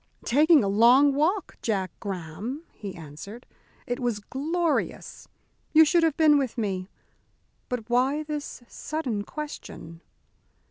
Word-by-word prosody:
"Taking 300 +3 +5
a - - 0
long 245 +8 +5
walk, 340 +8 0
Jack 195 -5 -1
Graham," 200 - -5
he 200 -3 -8
answered. 170 - -10 0.4
"It 245 0 -3
was 240 -4 -1
glorious. 315 +9 -2 0.5
You 320 0 +8
should 340 +3 +3
have 325 -3 +1
been 300 -2 +5
with 260 -4 -3
me. 195 -4 -2 0.8
But 245 -3 -4
why 260 +5 +1
this 295 -4 -6
sudden 255 -11 -3
question?" 215 - -8
250 Hz, 125 wpm, -26 LUFS, 205-300 Hz, 0.8 s, You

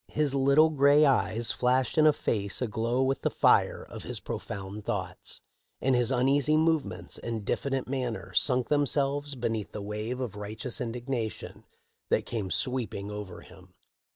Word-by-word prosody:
"* - - -53
His 150 -2 0
little 140 +4 +4
gray 145 +1 +5
eyes 120 -4 +1
flashed 125 0 +1
in 155 -1 +5
a - - +7
face 100 -8 -2
aglow 120 +2 0
with 135 +1 0
the - - +1
fire - - +3
of - - -9
his - - -5
profound 100 +1 -6
thoughts; - - -5 0.4
and 130 -1 +2
his 120 -2 +2
uneasy 135 +3 +2
movements 160 -2 0
and 115 -3 -4
diffident 135 +2 -1
manner 125 -7 -4
sunk 125 +6 +3
themselves 145 0 0
beneath 115 -4 -3
the 105 - -5
wave 105 +4 -4
of 120 -6 -4
righteous 105 +4 -4
indignation 120 -1 -4 0.4
that - - +1
came 105 -5 -3
sweeping 110 -4 -1
over 105 -4 -7
him. - - -17
125 Hz, 155 wpm, -28 LUFS, 110-140 Hz, 0.4 s, a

